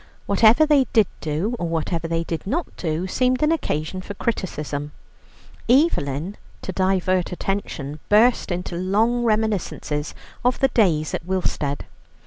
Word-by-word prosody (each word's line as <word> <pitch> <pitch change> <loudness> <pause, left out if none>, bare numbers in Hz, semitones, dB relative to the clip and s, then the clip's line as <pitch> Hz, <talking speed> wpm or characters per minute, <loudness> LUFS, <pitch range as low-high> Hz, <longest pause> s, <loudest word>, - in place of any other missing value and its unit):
Whatever 220 +8 +5
they 290 -3 +4
did 220 -3 +6
do, 160 +10 -2
or 175 - -1
whatever 165 +1 -2
they 165 0 -1
did 165 +2 -5
not 310 - -2
do, 165 +1 -2
seemed 255 +7 +1
an 300 - +3
occasion 185 - -2
for 205 +2 -8
criticism. 150 -9 -3 0.8
Evelyn, 195 - +2 0.3
to - - -4
divert 185 -1 +1
attention, 175 -6 -4
burst 220 0 +4
into 175 0 -3
long 215 +7 +1
reminiscences 210 -9 -1 0.3
of 250 +1 +2
the 270 - +3
days 165 - +2
at - - -2
Willstead. 170 -6 -1
185 Hz, 135 wpm, -22 LUFS, 165-230 Hz, 0.8 s, did